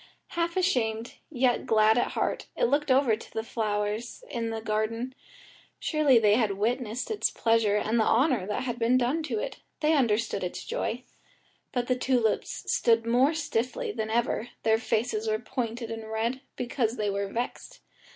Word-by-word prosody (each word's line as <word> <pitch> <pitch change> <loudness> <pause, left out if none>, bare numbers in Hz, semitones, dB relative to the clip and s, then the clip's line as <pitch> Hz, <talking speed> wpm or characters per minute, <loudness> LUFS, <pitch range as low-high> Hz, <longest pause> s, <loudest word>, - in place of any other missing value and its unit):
Half 340 +1 -1
ashamed, 235 - 0 0.2
yet 255 -4 +1
glad 220 0 +5
at 245 - 0
heart, - - -1
it - - -1
looked 295 -10 +2
over 260 -4 +4
to 220 - -13
the 220 - -1
other 225 - -14
flowers 215 - -2
in 230 -3 -2
the 225 0 -3
garden; 225 +3 -2 0.6
surely 300 -5 +3
they 210 -2 +5
had 215 -3 +2
witnessed 235 - -2
its 435 - +1
pleasure 225 -3 +2
and 220 +2 +1
the - - +4
honour 240 - +2
that 210 - -2
had 245 -2 -3
been 240 +2 +3
done 255 +6 +1
to 315 - -3
it; - - -4 0.2
they 310 0 +3
understood 230 -7 +1
its 180 - -4
joy. 245 +2 -3 0.7
But 245 -2 -1
the 255 - +1
tulips 250 -3 0
stood 230 -1 +3
more 255 +7 +3
stiffly 310 - -2
than 220 - -3
ever, 235 0 0
their 220 0 +3
faces 225 -1 -1
were 215 0 +2
pointed 235 -1 -4
and 225 -1 -6
red, 230 +4 -1
because 245 -2 -1
they 210 -1 0
were 200 0 -1
vexed. 235 +5 -5
230 Hz, 175 wpm, -28 LUFS, 220-255 Hz, 0.7 s, glad